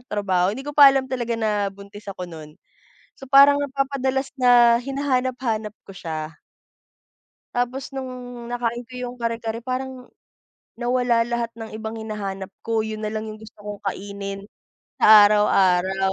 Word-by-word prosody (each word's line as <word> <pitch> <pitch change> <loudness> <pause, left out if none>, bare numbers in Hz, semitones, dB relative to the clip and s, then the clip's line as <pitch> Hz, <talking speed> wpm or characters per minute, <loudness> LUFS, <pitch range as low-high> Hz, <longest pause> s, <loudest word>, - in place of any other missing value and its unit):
trabaho 190 -3 +1
hindi 265 +5 -6
ko - - -3
pa 285 - +10
alam 270 -1 0
talaga 240 -2 -2
na 210 -2 0
buntis 200 +1 -13
ako 185 -2 -5
nun, 155 -2 -11 0.6
so 270 - -9
parang 280 +2 +7
napapadalas 270 -1 -1
na 240 -2 +6
hinahanap 260 -1 -1
hanap 215 -4 -2
ko 195 - -10
siya. 160 -2 -6 1.2
Tapos 250 +3 -2
nung 265 -1 -5 0.4
nakain 240 -1 -2
ko - - -16
yung 250 0 -5
kare-kare 230 -1 -3
parang, 255 0 -5 0.7
nawala 240 -1 +1
lahat 235 -1 -2
ng 220 -1 -7
ibang 220 +1 -6
hinahanap 200 -3 -5 0.2
ko 230 -1 0
yun 215 0 -4
nalang 215 +1 -3
yung 215 - -7
gusto 220 0 -14
kong 205 0 -8
kainin, 200 0 -5 0.5
sa 215 -1 +9
araw-araw. 190 -2 +3
225 Hz, 145 wpm, -23 LUFS, 205-255 Hz, 1.2 s, pa